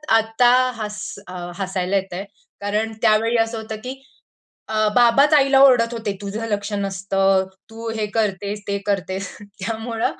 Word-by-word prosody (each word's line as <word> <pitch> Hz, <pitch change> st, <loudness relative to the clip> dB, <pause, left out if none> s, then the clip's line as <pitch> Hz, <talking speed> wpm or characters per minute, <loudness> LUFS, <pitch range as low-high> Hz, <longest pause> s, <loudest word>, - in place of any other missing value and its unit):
आता 225 Hz, +2 st, +3 dB, 0.3 s
हस 210 Hz, -2 st, -5 dB, 0.6 s
हसायला 190 Hz, -1 st, -2 dB
येतंय 190 Hz, 0 st, -4 dB, 0.4 s
कारण 210 Hz, +2 st, -1 dB
त्यावेळी 225 Hz, +1 st, +3 dB
असं 225 Hz, 0 st, 0 dB
होतं 220 Hz, 0 st, -6 dB
की, 255 Hz, +1 st, -4 dB, 0.8 s
अ, 215 Hz, 0 st, +2 dB
बाबाच 250 Hz, +5 st, +5 dB
आईला 275 Hz, -2 st, +5 dB
ओरडत 245 Hz, -4 st, +5 dB
होते, 225 Hz, -3 st, -3 dB
"तुझं 205 Hz, +3 st, -4 dB
लक्ष 205 Hz, 0 st, -2 dB
नसतं. 195 Hz, -1 st, +1 dB, 0.2 s
तू 225 Hz, +1 st, -7 dB
हे 215 Hz, -1 st, -1 dB
करतेस, 205 Hz, -1 st, -1 dB
ते 200 Hz, 0 st, 0 dB
करतेस." 195 Hz, -1 st, -2 dB
त्यामुळं 220 Hz, +3 st, -4 dB
215 Hz, 135 wpm, -21 LUFS, 200-230 Hz, 0.8 s, बाबाच